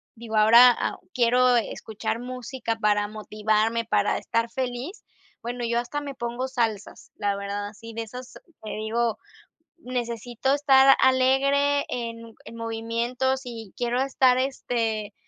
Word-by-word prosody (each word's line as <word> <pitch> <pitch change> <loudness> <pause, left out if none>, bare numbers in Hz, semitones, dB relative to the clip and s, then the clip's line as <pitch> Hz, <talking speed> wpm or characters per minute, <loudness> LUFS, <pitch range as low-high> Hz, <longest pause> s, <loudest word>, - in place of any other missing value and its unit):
digo, 225 -1 -7
ahora, 230 +3 +7
ah, - - -3
quiero 250 -2 +3
escuchar 220 0 -3
música 250 -1 -4
para 210 -1 +1
motivarme, 215 +2 0
para - - +1
estar 230 0 -1
feliz, 255 - -4 0.4
bueno, 240 +1 -4
yo 235 0 +1
hasta 290 +5 -4
me 285 -1 -6
pongo 240 +1 -4
salsas, 230 -6 -3
la 200 -1 -1
verdad, 200 +1 -4
así 230 +2 -12
de 230 +1 -4
esas 250 +3 -10 0.3
que 215 - -6
digo: 220 +1 -1 0.6
"Necesito 245 -2 -2
estar 270 -2 +6
alegre 275 +2 +3
en 230 -1 -6
en 230 - -10
movimiento". 230 +3 -2
Si 235 -6 -9
quiero 245 +1 -1
estar, 260 -2 +3
este 230 -5 -2
235 Hz, 135 wpm, -25 LUFS, 225-255 Hz, 0.6 s, ahora